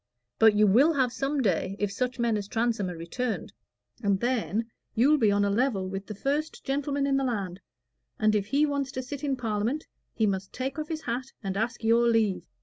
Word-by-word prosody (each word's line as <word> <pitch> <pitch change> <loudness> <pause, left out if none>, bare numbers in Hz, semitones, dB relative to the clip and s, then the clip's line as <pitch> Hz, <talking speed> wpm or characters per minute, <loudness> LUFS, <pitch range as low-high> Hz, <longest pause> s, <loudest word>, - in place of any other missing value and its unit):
But 220 -2 +6
you 210 +1 +5
will 255 +11 +5
have 260 -4 +1
some 275 0 -1
day, 190 -1 0
if 205 -1 -1
such 250 +5 -2
men 235 -2 +1
as 205 -2 -3
Transome 225 -3 0
are 175 - -6
returned; 220 +9 -3 0.5
and 200 -2 +2
then 230 -2 0 0.3
you'll 285 +6 +4
be 215 -4 +4
on 205 0 +2
a 200 - +1
level 210 -4 +1
with 195 +1 -5
the 215 - -6
first 290 +8 -2
gentleman 280 +1 -1
in 275 -1 +2
the 270 - +1
land, 200 -8 -2 0.6
and 215 0 +3
if 205 -1 0
he 285 +6 +3
wants 280 -2 -1
to 260 - -3
sit 280 +3 -7
in 280 -2 +1
Parliament, 230 +4 -1 0.3
he 220 - +2
must 195 -1 -1
take 265 +3 -4
off 305 - -4
his 315 -1 -4
hat 250 +2 -3
and 195 -1 -2
ask 225 +3 -2
your 230 +1 +4
leave. 220 -5 +1
235 Hz, 215 wpm, -28 LUFS, 205-270 Hz, 0.6 s, But